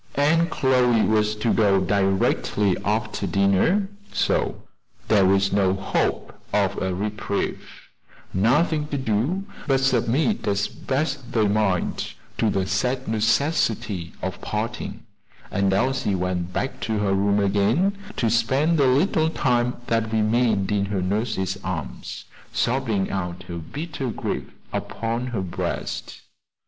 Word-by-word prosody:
And 165 +4 +3
Chloe 125 -5 +3
was 105 0 +2
to 105 +2 0
go 100 -3 +4
directly 95 +1 +1
after 105 +1 -1
dinner; 100 - +2 0.2
so - - 0 0.5
there 100 -3 +5
was 95 +1 +3
no 95 -2 +3
hope 95 - -1 0.2
of - - +1
a 95 - 0
reprieve, 105 +1 -3 0.6
nothing 150 - +2
to 145 - -2
do 130 - 0 0.2
but 135 -2 +3
submit 135 - +1
as 100 0 +1
best 135 -2 -3
they 110 -3 +3
might 100 -3 0 0.2
to 110 - +3
the 95 -2 0
sad 125 +6 -1
necessity 110 - 0
of - - -4
parting; - - -4 0.5
and 100 -1 +1
Elsie 105 0 +1
went 90 -1 -2
back 130 +8 -3
to 110 -2 -1
her 100 -2 +1
room 100 +1 +2
again, 105 - +2 0.2
to 115 - +1
spend 135 +8 +2
the 140 - +5
little 160 +4 +3
time 125 -5 +1
that 115 -2 0
remained 110 -2 +2
in 100 -1 +1
her 100 -2 -2
nurse's 95 0 -1
arms, - - -5 0.3
sobbing 115 -6 0
out 90 -2 -3
her 85 -1 -6
bitter 145 - -5
grief - - -3 0.2
upon 115 +2 -2
her 115 -6 -2
breast. 90 -2 -4
110 Hz, 130 wpm, -24 LUFS, 100-130 Hz, 0.6 s, there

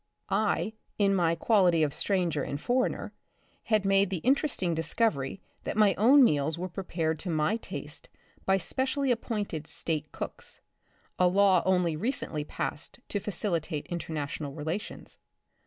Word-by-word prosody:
I, 210 -2 +1 0.2
in 200 -1 +3
my 170 -3 +2
quality 180 -6 +4
of 145 -2 0
stranger 175 -7 0
and 140 +1 -3
foreigner, 250 +8 0 0.5
had 215 -3 +2
made 195 0 +4
the 190 - -1
interesting 260 - +2
discovery 160 - -1 0.2
that - - -3
my 210 -2 +5
own 260 +9 +6
meals 150 - +2
were 185 +2 -4
prepared 165 -4 -2
to 185 - -4
my 160 +7 +1
taste - - -8 0.3
by 190 0 +3
specially 265 - 0
appointed 205 -9 -2
State 155 -2 -3
cooks - - -7 0.3
— - - -34
a 180 - +5
law 190 -1 +5
only 180 -3 +2
recently 170 - -2
passed 150 - -4
to 205 - -1
facilitate 170 -6 -2
international 150 -4 -4
relations. 160 +7 -5
180 Hz, 140 wpm, -29 LUFS, 160-210 Hz, 0.5 s, own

